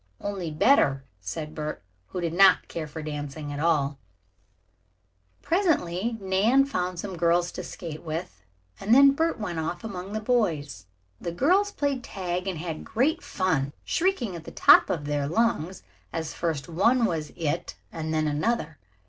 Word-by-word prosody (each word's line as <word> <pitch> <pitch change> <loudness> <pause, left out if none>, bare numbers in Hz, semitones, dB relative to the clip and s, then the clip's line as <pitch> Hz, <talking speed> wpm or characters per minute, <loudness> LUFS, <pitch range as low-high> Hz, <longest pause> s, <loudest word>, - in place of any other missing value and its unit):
"Only 195 -5 -4
better," 150 - +3 0.2
said 100 - -5
Bert, 155 - -5 0.2
who 180 - -5
did 165 -1 -2
not 195 +2 +6
care 160 -2 -5
for 155 +1 -7
dancing 145 0 -5
at 145 - -5
all. 145 -4 +1 1.4
Presently 235 - +1
Nan 205 +8 +3
found 180 -9 -2
some 190 0 -5
girls 175 +1 +2
to - - -6
skate 160 -3 -7
with 160 - -5 0.4
and 220 +4 +3
then 275 +1 +8
Bert 325 +1 0
went 180 -6 -3
off 170 +2 -3
among 195 -2 -6
the 215 - -1
boys. 165 - -1 0.3
The 170 - -4
girls 370 - +2
played 280 -7 -1
tag 180 -2 -4
and 185 -3 -2
had 160 -1 -5
great 300 +9 +1
fun, 155 -7 -1
shrieking 330 - 0
at 165 -1 -9
the - - -8
top - - +6
of 150 -4 -2
their 145 -1 -1
lungs 190 -2 0 0.3
as 160 -1 -4
first 160 -5 -2
one 230 +9 +3
was 160 -7 -2
"it" 165 +1 -2 0.2
and 160 -1 -4
then 155 -1 +1
another. 155 +1 -1
175 Hz, 160 wpm, -26 LUFS, 155-220 Hz, 1.4 s, then